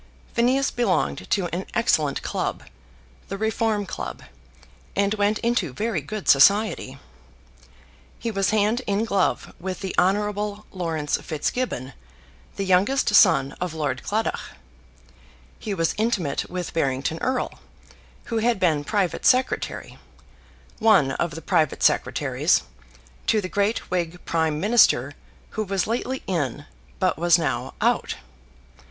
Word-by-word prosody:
Phineas 255 +4 +2
belonged 180 - 0
to 195 - +1
an 185 - -4
excellent 155 -11 +1
club, - - -3 0.6
the 195 - -5
Reform 220 -1 0
Club, 65 - -6 0.7
and 200 +1 +2
went 205 0 +1
into 230 - 0
very 210 - -1
good 205 +3 -6
society. 165 -2 +4 1.2
He 230 - -3
was 195 -2 +1
hand 215 +3 +2
in 205 +2 +1
glove 200 -4 0
with 185 +1 -5
the 190 -2 -3
Hon. 210 +2 0
Laurence 165 -5 -1
Fitzgibbon, 150 - -3 0.6
the 195 - -2
youngest 200 +6 +2
son 135 -9 +6
of 180 -3 -3
Lord 140 -5 -2
Claddagh. 220 +2 -1 1.2
He 205 -2 -3
was 165 -2 +1
intimate 195 -11 0
with 180 -1 -4
Barrington 140 0 -1
Erle, 260 0 -2 0.6
who 230 -1 -2
had 230 -1 +1
been 155 -5 +2
private 190 -3 -1
secretary, 255 +1 +1 0.8
one 215 -12 +5
of 165 +3 -2
the 165 - -8
private 160 -5 +1
secretaries, - - +2 0.6
to 220 - +3
the 190 - -3
great 205 +2 -1
Whig 175 -1 -1
Prime 160 -2 0
Minister 220 +6 +4 0.4
who 220 - -2
was 195 -2 -1
lately 250 +3 -2
in 145 -10 -2 0.3
but - - 0
was 175 0 +5
now 165 -4 -2
out. - - +1
195 Hz, 125 wpm, -24 LUFS, 160-220 Hz, 1.2 s, son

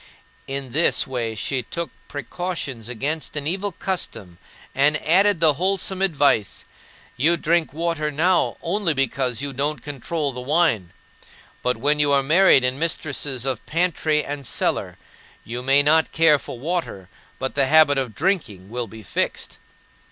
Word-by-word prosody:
In 135 -2 -4
this 160 +6 +2
way 120 -4 -3
she 130 +4 -2
took 170 +8 -5 0.2
precautions 145 -6 -5
against 145 +7 -3
an 145 -1 -3
evil 195 +5 -1
custom 110 - -4 0.3
and 150 +2 +3
added 195 +3 +4
the 160 -2 +5
wholesome 190 +3 -1
advice: 145 - +1 0.5
"You 160 +7 +3
drink 165 +1 +1
water 160 0 -2
now 170 +5 +1
only 175 -2 0
because 130 -1 0
you 140 -1 -3
don't 145 +3 -2
control 145 +1 -3
the 125 - -6
wine; 130 - +1 0.7
but 125 -1 0
when 145 +5 +1
you 145 -1 +3
are 140 -1 +3
married 160 -1 +5
and 125 +2 0
mistresses 145 -5 -1
of 130 -5 -2
pantry 160 -2 0
and 140 -2 -5
cellar, - - -1 0.5
you 120 +2 -5
may 135 +2 +4
not 160 +2 +3
care 160 -3 +4
for 125 - -8
water, 145 - -3 0.3
but 130 - -4
the 140 -2 +2
habit 150 -2 +5
of 125 -5 -4
drinking 115 - -2
will 120 -1 -3
be 110 +2 -12
fixed." - - -3
145 Hz, 150 wpm, -22 LUFS, 130-165 Hz, 0.7 s, the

